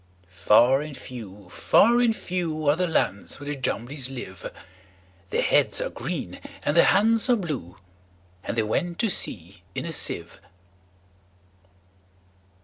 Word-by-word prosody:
Far 120 Hz, +9 st, +4 dB
and 150 Hz, -2 st, -7 dB
few, 105 Hz, -6 st, -10 dB
far 235 Hz, +3 st, +4 dB
and 235 Hz, -2 st, +3 dB
few, 165 Hz, -6 st, -3 dB
Are 145 Hz, -, +5 dB
the 180 Hz, +2 st, 0 dB
lands 100 Hz, -, -1 dB
where 145 Hz, -, -9 dB
the 145 Hz, 0 st, -3 dB
Jumblies 130 Hz, 0 st, -3 dB
live:Their 95 Hz, -5 st, -8 dB
heads -, -, +2 dB
are -, -, -2 dB
green, -, -, -5 dB, 0.2 s
and 145 Hz, -, 0 dB
their 170 Hz, -, +7 dB
hands 225 Hz, +2 st, +3 dB
are 245 Hz, -, +6 dB
blue; 150 Hz, -, -5 dB, 0.7 s
And -, -, -4 dB
they 110 Hz, -, +3 dB
went 170 Hz, +11 st, -1 dB
to 225 Hz, -, +1 dB
sea 90 Hz, -, -3 dB
in -, -, -3 dB
a 170 Hz, -, -4 dB
sieve. 85 Hz, -, -3 dB
135 Hz, 140 wpm, -25 LUFS, -, 0.7 s, their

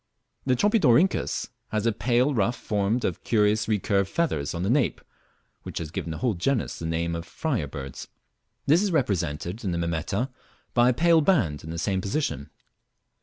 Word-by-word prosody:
The 130 Hz, -, +4 dB
Tropidorhynchus 190 Hz, -, +3 dB, 0.2 s
has 110 Hz, 0 st, -2 dB
a 115 Hz, -, +4 dB
pale 125 Hz, +5 st, +1 dB
ruff 115 Hz, +1 st, +1 dB
formed 105 Hz, +3 st, -1 dB
of -, -, -3 dB
curious 105 Hz, -1 st, +2 dB
recurved 100 Hz, -2 st, +1 dB
feathers 85 Hz, -, -1 dB
on 85 Hz, -, -2 dB
the 95 Hz, -, 0 dB
nape 140 Hz, 0 st, +2 dB, 0.6 s
(which -, -, -7 dB
has 80 Hz, -2 st, -4 dB
given 85 Hz, -, -4 dB
the 80 Hz, -, -4 dB
whole 125 Hz, -3 st, +1 dB
genus 115 Hz, +7 st, -1 dB
the 80 Hz, -, -4 dB
name 85 Hz, +1 st, -1 dB
of 85 Hz, -, -4 dB
Friar 120 Hz, -, -2 dB
birds); 70 Hz, -2 st, -7 dB, 0.6 s
this 160 Hz, +6 st, +5 dB
is 205 Hz, -2 st, 0 dB
represented 90 Hz, -, -1 dB
in 100 Hz, -, -1 dB
the -, -, -1 dB
Mimeta 85 Hz, -, -1 dB, 0.4 s
by 120 Hz, 0 st, +5 dB
a -, -, +3 dB
pale 165 Hz, +2 st, +5 dB
band 115 Hz, -, +2 dB
in 80 Hz, -, -8 dB
the 85 Hz, -, -4 dB
same 95 Hz, +2 st, 0 dB
position. 100 Hz, -, -2 dB
105 Hz, 175 wpm, -26 LUFS, 85-130 Hz, 0.6 s, this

